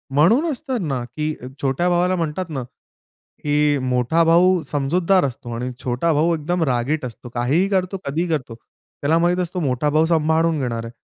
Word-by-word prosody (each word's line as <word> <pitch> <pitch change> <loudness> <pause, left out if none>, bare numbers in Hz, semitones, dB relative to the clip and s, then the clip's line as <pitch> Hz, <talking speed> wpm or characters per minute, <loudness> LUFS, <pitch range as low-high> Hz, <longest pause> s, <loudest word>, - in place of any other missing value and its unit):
म्हणूनच 245 - +3
तर 260 -2 0
ना 135 - -2
की 150 +6 -3
अ, 125 - -7
छोट्या 140 +6 +1
भावाला 180 +1 +2
म्हणतात 165 +1 -3
ना 135 -4 -4 0.8
की 145 0 +2
मोठा 125 +7 +2
भाऊ 175 +2 +4
समजूतदार 170 +5 +2
असतो 120 -2 -6
आणि 125 +2 -3
छोटा 125 +7 0
भाऊ 160 +3 +2
एकदम 165 +3 -1
रागीट 130 +1 0
असतो, 120 +1 -9
काहीही 130 +10 +1
करतो, 190 -1 0
कधीही 160 +6 -1
करतो. 130 -8 -2
त्याला 145 +6 -4
माहीत 175 +1 +2
असतो, 180 +1 -4
मोठा 140 -1 0
भाऊ 155 +2 +3
सांभाळून 160 0 +2
घेणार 115 -2 -2
आहे. 115 - -8
155 Hz, 175 wpm, -21 LUFS, 130-175 Hz, 0.8 s, भाऊ